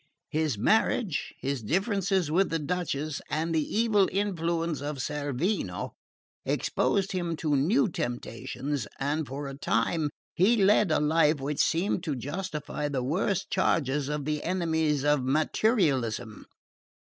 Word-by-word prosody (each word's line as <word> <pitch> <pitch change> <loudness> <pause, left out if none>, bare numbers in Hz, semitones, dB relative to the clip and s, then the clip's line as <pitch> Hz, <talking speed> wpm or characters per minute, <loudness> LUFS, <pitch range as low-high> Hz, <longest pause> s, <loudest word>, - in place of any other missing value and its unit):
His 155 -6 0
marriage, 210 - +1
his 135 -2 -2
differences 190 - 0
with 190 +4 +3
the 165 - 0
Duchess, 155 -2 -2
and 160 +2 -1
the 160 - +3
evil 210 +3 +2
influence 170 -5 -1
of 145 0 -3
Cerveno, 150 - -2 0.5
exposed 195 -1 0
him 175 -3 -1
to 155 -2 0
new 210 - +3
temptations, 120 - -4
and 145 +2 -1
for 140 +2 -5
a 135 - -6
time 140 - 0 0.2
he 210 +7 +4
led 205 -1 +4
a 155 - +3
life 150 0 +3
which 140 +2 -3
seemed 175 +2 +1
to 150 - -1
justify 150 +1 -4
the 135 -3 -2
worst 175 +7 -1
charges 140 -2 +1
of 150 -2 -2
the 150 0 -1
enemies 160 -5 0
of 145 -3 +3
materialism. 135 - +1
155 Hz, 135 wpm, -28 LUFS, 140-180 Hz, 0.5 s, he